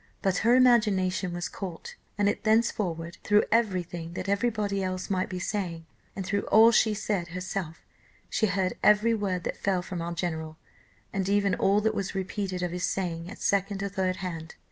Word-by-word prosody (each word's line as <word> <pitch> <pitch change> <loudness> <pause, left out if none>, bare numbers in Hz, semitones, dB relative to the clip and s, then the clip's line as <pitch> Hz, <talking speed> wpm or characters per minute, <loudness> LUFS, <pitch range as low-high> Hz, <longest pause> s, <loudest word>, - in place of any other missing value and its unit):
But, 190 -2 +2
her 235 +3 +4
imagination 205 -7 +3
was 175 +2 -3
caught, 185 -4 -7 0.2
and 205 -1 +2
it 205 - -1
thenceforward 200 -7 0
through 210 0 +4
every 210 -6 +2
thing 170 -1 -7
that 185 - -5
every 200 +5 +2
body 205 -3 -2
else 185 +1 -3
might 185 -1 0
be 185 - -4
saying, 175 -3 -3 0.3
and 190 - -4
through 200 +2 -1
all 225 +2 +7
she 220 -1 +3
said 200 -4 -2
herself, 180 -2 -5 0.4
she 220 - +1
heard 190 -2 0
every 210 +2 +5
word 195 -5 -1
that - - -3
fell 190 -3 0
from 180 -1 -5
our 170 0 -4
general, 160 -2 -3 0.6
and 195 -1 -1
even 200 -1 +2
all 200 +2 +3
that 220 +1 +1
was 195 0 -3
repeated 190 -1 -3
of 175 - -1
his 180 0 -1
saying 170 -2 -3
at 220 - -9
second 200 0 +1
or 200 - -2
third 185 -1 -1
hand. 165 -3 -6
190 Hz, 190 wpm, -28 LUFS, 180-205 Hz, 0.6 s, all